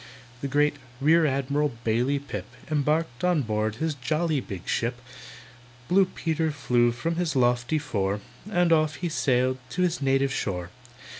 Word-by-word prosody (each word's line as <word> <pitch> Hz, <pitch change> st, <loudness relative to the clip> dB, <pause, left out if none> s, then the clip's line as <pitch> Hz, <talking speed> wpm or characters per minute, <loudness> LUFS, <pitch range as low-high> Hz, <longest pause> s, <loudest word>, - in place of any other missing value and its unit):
The 140 Hz, -, -2 dB
great 145 Hz, +1 st, +2 dB, 0.2 s
REAR 160 Hz, +3 st, +5 dB
ADMIRAL 140 Hz, +1 st, 0 dB
BAILEY 120 Hz, +5 st, +1 dB
PIP 105 Hz, -9 st, -6 dB, 0.2 s
Embarked 150 Hz, -1 st, 0 dB
on 175 Hz, -5 st, +3 dB
board 110 Hz, -1 st, -1 dB
his 160 Hz, +6 st, -1 dB
jolly 155 Hz, +3 st, 0 dB
big 95 Hz, -7 st, -7 dB
ship, 120 Hz, +1 st, -1 dB, 0.9 s
Blue 195 Hz, +2 st, +5 dB
Peter 160 Hz, -3 st, -1 dB
flew 125 Hz, -5 st, +2 dB
from 165 Hz, +8 st, -2 dB
his 175 Hz, -4 st, -1 dB
lofty 125 Hz, +3 st, +2 dB
fore, 100 Hz, -9 st, -1 dB, 0.3 s
And 175 Hz, -4 st, +3 dB
off 155 Hz, -2 st, +2 dB
he 170 Hz, +6 st, -3 dB
sailed 130 Hz, -3 st, +1 dB
to 180 Hz, +8 st, 0 dB
his 175 Hz, -3 st, 0 dB
native 135 Hz, 0 st, +2 dB
shore. 90 Hz, -3 st, -3 dB
140 Hz, 150 wpm, -26 LUFS, 120-160 Hz, 0.9 s, REAR